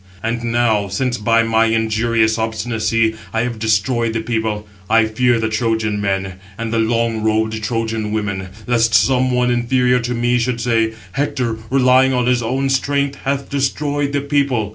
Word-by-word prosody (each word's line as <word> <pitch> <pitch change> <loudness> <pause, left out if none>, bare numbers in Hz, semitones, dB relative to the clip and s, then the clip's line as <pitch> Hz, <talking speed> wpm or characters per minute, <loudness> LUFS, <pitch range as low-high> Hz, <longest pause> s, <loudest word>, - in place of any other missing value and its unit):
And 115 +1 -2
now, 115 -3 +1
since 120 +5 -2
by 115 +2 +3
my 115 0 +2
injurious 110 0 +1
obstinacy 110 0 0 0.2
I 115 - 0
have 120 -2 -3
destroyed 115 +2 +1
the 115 - -1
people, 110 -2 -2 0.2
I 115 0 +4
fear 120 +2 +1
the 110 - 0
Trojan 110 -2 -1
men, 95 -2 -2 0.2
and 115 0 -4
the 115 - +1
long 115 0 0
robed 110 0 0
Trojan 110 -1 -2
women, 100 -3 -3 0.2
lest 115 -2 +2
some 125 +4 +3
one 125 0 +1
inferior 125 +1 +2
to 120 +1 -3
me 120 +1 +1
should 120 0 -1
say, 115 -2 +1 0.2
'Hector, 125 -3 -2
relying 130 0 +4
on 125 -1 +1
his 125 0 +2
own 130 +4 -1
strength, 140 +1 0
has 140 0 0
destroyed 140 +1 -1
the 140 0 0
people. 140 -7 0
115 Hz, 165 wpm, -18 LUFS, 110-125 Hz, 0.2 s, I